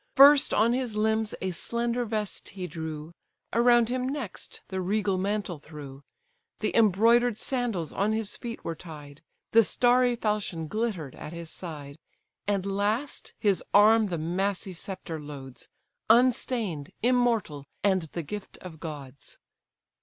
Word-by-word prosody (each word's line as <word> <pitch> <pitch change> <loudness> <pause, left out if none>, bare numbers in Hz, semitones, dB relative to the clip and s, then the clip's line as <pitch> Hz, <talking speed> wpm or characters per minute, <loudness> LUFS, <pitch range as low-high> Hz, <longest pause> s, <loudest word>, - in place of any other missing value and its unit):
First 280 +1 +8
on 230 +3 +3
his 250 -4 -2
limbs 220 0 +1
a 190 - 0
slender 235 +6 -1
vest 215 -2 -3
he 190 -2 -6
drew, 160 -2 -6 0.4
Around 235 0 +5
him 255 +1 -1
next 270 -8 -6
the 190 -1 -2
regal 195 0 0
mantle 195 -4 -2
threw, 145 -3 -10 0.6
The - - -2
embroider'd 230 +2 +4
sandals 230 - -1
on 205 +2 +1
his 220 -2 -1
feet 235 -1 -7
were 165 - -2
tied; 150 -3 -11 0.3
The 230 0 +7
starry 245 +3 +3
falchion 210 -7 -1
glitter'd 195 - -2
at 155 - -8
his 170 -1 -6
side; 150 -5 -7 0.5
And 200 -2 0
last, 205 +7 -2
his 200 -4 +1
arm 215 +1 +6
the 175 -3 -3
massy 185 +4 -1
sceptre 175 -2 -6
loads, 135 -4 -10 0.4
Unstain'd, 230 - +2
immortal, 230 - +1 0.2
and 185 -5 +2
the 170 - -3
gift 205 +6 -7
of 165 -4 -10
gods. 140 -4 -9
200 Hz, 140 wpm, -27 LUFS, 165-230 Hz, 0.6 s, First